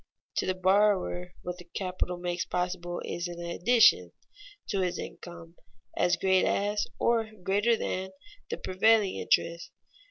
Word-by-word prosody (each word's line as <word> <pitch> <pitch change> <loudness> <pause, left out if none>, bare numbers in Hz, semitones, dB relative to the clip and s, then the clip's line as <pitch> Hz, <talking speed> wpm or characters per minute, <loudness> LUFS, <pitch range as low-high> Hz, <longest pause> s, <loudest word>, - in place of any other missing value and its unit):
To - - 0
the 185 - 0
borrower, 185 -2 +2
what 180 0 -5
the - - -10
capital 180 0 -3
makes 175 0 -2
possible 180 -1 -3
is 175 +1 -3
an 175 0 -8
addition 175 +7 +3 0.6
to 200 - 0
his 180 -2 -1
income 170 -1 -9 0.4
as 175 - +2
great 190 +1 +3
as, 205 +1 0
or 230 -2 +1
greater 205 +5 +2
than, 190 -2 -3 0.4
the - - -3
prevailing 205 +1 +2
interest. 170 +1 0
185 Hz, 135 wpm, -28 LUFS, 175-200 Hz, 0.6 s, addition